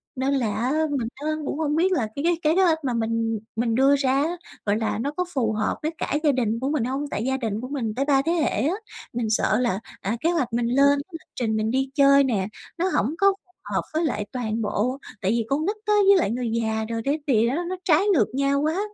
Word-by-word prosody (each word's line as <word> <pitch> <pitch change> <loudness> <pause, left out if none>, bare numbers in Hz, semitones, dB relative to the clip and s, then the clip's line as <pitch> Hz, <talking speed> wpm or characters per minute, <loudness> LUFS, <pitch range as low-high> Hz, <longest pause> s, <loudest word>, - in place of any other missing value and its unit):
nên 265 +1 0
là 235 -7 0
á 240 +5 0 0.2
mình 260 -5 -1
á 290 +3 -6 0.2
cũng 285 - -3
không 300 -2 0
biết 355 +4 +2
là 260 -12 +1
cái 280 - -3
cái 340 0 +2 0.2
kế 380 - +4
hoạch 330 -3 +4
mà 255 -3 -1
mình 225 -1 -1 0.2
mình 230 0 0
đưa 270 +3 +5
ra 270 -2 +1
á, 340 +3 -2 0.3
gọi 205 0 +2
là, 220 -1 -1
nó 275 +5 -1
có 360 - +1
phù 235 -5 +1
hợp 215 0 0
với 310 - 0
cả - - -1
gia 300 - +5
đình 230 -4 0
của 265 +3 -1
mình 295 -5 0
hông? 265 +4 -2
Tại 210 - -2
gia 265 0 0
đình 220 -4 -3
của 255 - -5
mình 245 -6 -3
tới 270 +2 0
3 275 -2 +3
thế 320 +4 -1
hệ 335 -4 +2 0.2
á. 345 - 0 0.4
Mình 235 -2 -2
sợ 215 0 +2
là, 235 -6 0 0.2
à, 210 +5 -2
kế 330 - +2
hoạch 280 -9 -1
mình 235 0 +1
lên, 280 +3 +4
lịch 325 -1 -10
trình 220 -3 -1
mình 215 +1 0
đi 265 +1 0
chơi 280 -1 +6
nè, 210 -8 0 0.3
nó 360 +2 +1
hổng 265 +10 +1
có 395 - +4 0.2
phù 360 - -32 0.2
hợp - - +2
với 320 +2 +1
lại 210 -8 -1
toàn 230 -3 -2
bộ. 225 +4 -1 0.2
Tại 190 0 +1
vì 230 0 0
con 290 +3 0
nít 410 +4 0
á, 420 - +2
với 400 0 +7
lại 335 - +1
người 240 0 -2
già 220 0 -1
rồi 230 0 -2
cái 290 +3 +1
gì 230 -4 +3
á 290 +9 -1
nó 370 - -2
trái 340 +1 +4
ngược 320 - +3
nhau 280 +1 +1
quá, 315 +5 0
265 Hz, 265 wpm, -24 LUFS, 225-300 Hz, 0.4 s, với